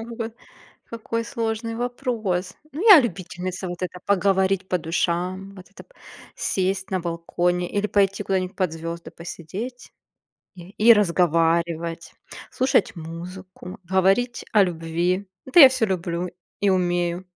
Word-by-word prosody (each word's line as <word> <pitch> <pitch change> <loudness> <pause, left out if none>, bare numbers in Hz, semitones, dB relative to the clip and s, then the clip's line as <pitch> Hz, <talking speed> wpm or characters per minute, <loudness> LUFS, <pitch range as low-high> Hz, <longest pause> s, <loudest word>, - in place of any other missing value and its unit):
Ой, 225 - -6
какой 230 -1 -5 0.5
какой 230 0 -4
сложный 230 -2 -3
вопрос. 235 -7 -2 0.2
Ну, 310 +7 -4
я 350 - +11
любительница 185 -3 -4
вот 175 0 -7
это: 180 0 -4
поговорить 195 -1 +2
по 180 - +1
душам, 180 +4 -2
вот 185 0 -14
это - - -14
п - - -28 0.4
сесть 190 0 -1
на 185 - 0
балконе 175 +1 -1
или 205 +1 0
пойти 200 -1 +1
куда-нибудь 185 -1 -2
под 185 -4 0
звезды 165 +1 -6
посидеть 190 +9 -8 0.6
и 175 -1 -12
и 230 +3 +6
разговаривать, 170 -3 +1 0.4
слушать 255 -8 +1
музыку, 180 +3 -9
говорить 190 +7 +1
о 210 -2 +6
любви. 175 +3 -1 0.2
Это 260 +7 +4
я 270 - +11
всё 260 -3 +1
люблю 175 -2 -2 0.3
и 205 - +3
умею. 175 -1 0
185 Hz, 135 wpm, -23 LUFS, 175-215 Hz, 0.6 s, я